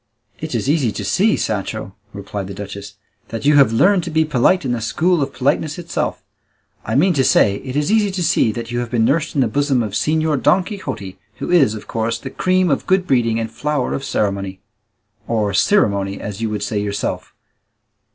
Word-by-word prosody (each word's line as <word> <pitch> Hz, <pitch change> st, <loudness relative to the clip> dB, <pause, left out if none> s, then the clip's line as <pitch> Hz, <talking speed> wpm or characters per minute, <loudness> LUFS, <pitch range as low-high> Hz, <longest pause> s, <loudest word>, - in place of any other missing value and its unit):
"It -, -, -4 dB
is -, -, -1 dB
easy 140 Hz, -6 st, +2 dB
to 100 Hz, 0 st, -5 dB
see, 200 Hz, -, +2 dB
Sancho," 105 Hz, -1 st, -3 dB, 0.2 s
replied 100 Hz, -1 st, -6 dB
the 100 Hz, -, -7 dB
duchess, 100 Hz, -1 st, -8 dB, 0.3 s
"that 115 Hz, -1 st, -6 dB
you 145 Hz, 0 st, +5 dB
have 135 Hz, -5 st, +6 dB
learned 180 Hz, -, +3 dB
to -, -, -4 dB
be 160 Hz, 0 st, +2 dB
polite 150 Hz, +4 st, +2 dB
in 125 Hz, -, -1 dB
the 120 Hz, -2 st, -2 dB
school 160 Hz, -, +1 dB
of 140 Hz, 0 st, -1 dB
politeness 145 Hz, +3 st, 0 dB
itself; 170 Hz, -1 st, -3 dB, 0.6 s
I 110 Hz, -, -3 dB
mean 175 Hz, +7 st, +4 dB
to 135 Hz, -4 st, +2 dB
say 100 Hz, -5 st, +3 dB
it 130 Hz, +4 st, -7 dB
is 150 Hz, +6 st, 0 dB
easy 215 Hz, -2 st, +3 dB
to 190 Hz, -2 st, -2 dB
see 135 Hz, -8 st, +2 dB
that 115 Hz, +2 st, -6 dB
you 120 Hz, -, -1 dB
have 120 Hz, -1 st, -3 dB
been 115 Hz, -1 st, +1 dB
nursed 155 Hz, +6 st, 0 dB
in 140 Hz, -, +3 dB
the 125 Hz, -, +3 dB
bosom 135 Hz, 0 st, +1 dB
of 105 Hz, -, -4 dB
Señor 155 Hz, +2 st, +1 dB
Don 185 Hz, +1 st, +4 dB
Quixote, 130 Hz, -, -6 dB, 0.2 s
who -, -, -5 dB
is, 140 Hz, -11 st, +4 dB
of 105 Hz, -, -9 dB
course, 115 Hz, 0 st, -1 dB
the 135 Hz, +3 st, -8 dB
cream 185 Hz, 0 st, +1 dB
of 135 Hz, -, -1 dB
good 190 Hz, -1 st, +2 dB
breeding 115 Hz, -6 st, +1 dB
and 115 Hz, 0 st, -4 dB
flower 150 Hz, -3 st, -2 dB
of 135 Hz, -, -3 dB
ceremony 100 Hz, -5 st, -2 dB, 0.7 s
or 105 Hz, -3 st, 0 dB
cirimony, 100 Hz, -, +2 dB
as 105 Hz, +1 st, -6 dB
you 115 Hz, -, -1 dB
would 105 Hz, -1 st, -3 dB
say 105 Hz, 0 st, -2 dB
yourself. 100 Hz, 0 st, -4 dB
125 Hz, 210 wpm, -19 LUFS, 105-155 Hz, 0.7 s, have